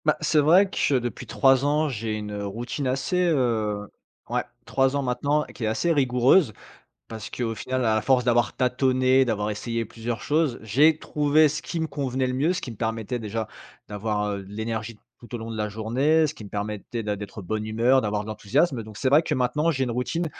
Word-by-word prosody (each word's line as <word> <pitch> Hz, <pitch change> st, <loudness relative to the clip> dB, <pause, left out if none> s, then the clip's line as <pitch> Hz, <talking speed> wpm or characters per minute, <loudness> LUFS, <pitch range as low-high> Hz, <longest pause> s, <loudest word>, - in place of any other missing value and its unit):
Bah 155 Hz, -, +3 dB
c'est 155 Hz, 0 st, +2 dB
vrai 175 Hz, +7 st, +5 dB
que 145 Hz, -6 st, 0 dB
depuis 120 Hz, -1 st, -3 dB
3 135 Hz, -1 st, +3 dB
ans 150 Hz, +2 st, +2 dB
j'ai 115 Hz, -5 st, -3 dB
une 105 Hz, -1 st, -5 dB
routine 120 Hz, +7 st, -4 dB
assez, 135 Hz, +8 st, -1 dB
heu 110 Hz, -8 st, 0 dB, 0.4 s
ouais -, -, +1 dB, 0.2 s
3 135 Hz, 0 st, +1 dB
ans 140 Hz, -, 0 dB
maintenant, 140 Hz, +4 st, 0 dB
qui 120 Hz, -, -9 dB
est -, -, +1 dB
assez 165 Hz, +10 st, +1 dB
rigoureuse 130 Hz, -, +3 dB, 0.5 s
parce 110 Hz, -1 st, -7 dB
qu'au 115 Hz, -2 st, -3 dB
final 130 Hz, +3 st, -2 dB
à 110 Hz, -1 st, +2 dB
force 130 Hz, 0 st, +3 dB
d'avoir 120 Hz, 0 st, +2 dB
tâtonné, 130 Hz, +1 st, +3 dB
d'avoir 105 Hz, -3 st, -1 dB
essayé 115 Hz, +2 st, -3 dB
plusieurs 115 Hz, +2 st, -5 dB
choses, 150 Hz, -4 st, +1 dB
j'ai 145 Hz, +9 st, +4 dB
trouvé 150 Hz, 0 st, +3 dB
ce 150 Hz, +2 st, -4 dB
qui 170 Hz, -, -4 dB
me 160 Hz, -, 0 dB
convenait 135 Hz, -4 st, -2 dB
le 125 Hz, -, -1 dB
mieux, 145 Hz, +7 st, +1 dB
ce 180 Hz, -, -3 dB
qui 125 Hz, -, -6 dB
me -, -, -9 dB
permettait 115 Hz, +2 st, -2 dB
déjà 110 Hz, 0 st, -4 dB, 0.4 s
d'avoir, 105 Hz, 0 st, -2 dB
heu, 100 Hz, -1 st, -4 dB
de 95 Hz, -, -13 dB
l'énergie 110 Hz, +1 st, -4 dB, 0.2 s
tout 120 Hz, 0 st, -9 dB
au -, -, -2 dB
long 115 Hz, 0 st, -6 dB
de -, -, -5 dB
la 105 Hz, 0 st, -1 dB
journée, 130 Hz, +10 st, +2 dB
ce 150 Hz, -, -3 dB
qui -, -, -11 dB
me 100 Hz, -, -10 dB
permettait 105 Hz, +3 st, -4 dB
d'ê 105 Hz, -1 st, -1 dB
d'être 100 Hz, 0 st, -8 dB
bonne 110 Hz, +4 st, -3 dB
humeur, 120 Hz, +5 st, +3 dB
d'avoir 105 Hz, -1 st, -1 dB
de -, -, -11 dB
l'enthousiasme, 115 Hz, -, 0 dB
donc 110 Hz, -1 st, -11 dB
c'est 130 Hz, -, +1 dB
vrai 145 Hz, +4 st, +6 dB
que -, -, -2 dB
maintenant 150 Hz, +6 st, +1 dB
j'ai 135 Hz, -5 st, 0 dB
une 125 Hz, -, -2 dB
routine 125 Hz, +8 st, -2 dB
120 Hz, 215 wpm, -25 LUFS, 110-140 Hz, 0.5 s, vrai